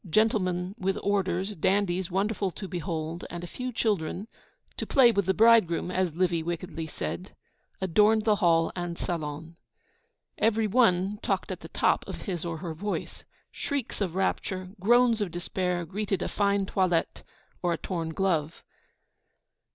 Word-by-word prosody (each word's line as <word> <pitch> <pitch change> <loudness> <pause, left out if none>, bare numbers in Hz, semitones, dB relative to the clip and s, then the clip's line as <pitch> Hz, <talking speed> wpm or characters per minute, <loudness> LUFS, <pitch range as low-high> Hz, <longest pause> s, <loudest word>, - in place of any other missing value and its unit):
Gentlemen 185 -2 +1
with 190 +1 0
orders, 195 0 0
dandies 185 0 +1
wonderful 195 +1 0
to 195 +2 -7
behold, 165 -1 -4
and 175 0 -6
a - - -5
few 250 +7 -5
children 205 -3 -1 0.5
(to - - -4
play 255 -4 +6
with 200 -4 0
the 190 - +4
bridegroom, 215 -7 +4
as 185 -3 0
Livy 175 -2 +1
wickedly 165 -1 -4
said), 180 +4 -5 0.4
adorned 210 +4 +3
the 215 -2 +4
hall 165 -4 +3
and 175 -1 -4
salon. 160 -1 -4 0.8
Every 225 0 +3
one 205 -3 +3
talked - - -1
at - - -4
the - - -10
top - - +2
of - - -6
his 180 -6 -3
or 170 -2 -3
her 165 0 -5
voice. 205 +6 -4 0.3
Shrieks 280 -8 -3
of 185 -4 -1
rapture, 185 -1 -1
groans 235 +2 +4
of 200 - 0
despair, 175 +1 -2
greeted 195 +1 -2
a - - -1
fine 200 -1 +1
toilette 185 -3 0 0.4
or 175 -1 +1
a - - -2
torn 165 -3 -3
glove. 165 -3 -1
185 Hz, 150 wpm, -28 LUFS, 170-205 Hz, 0.8 s, play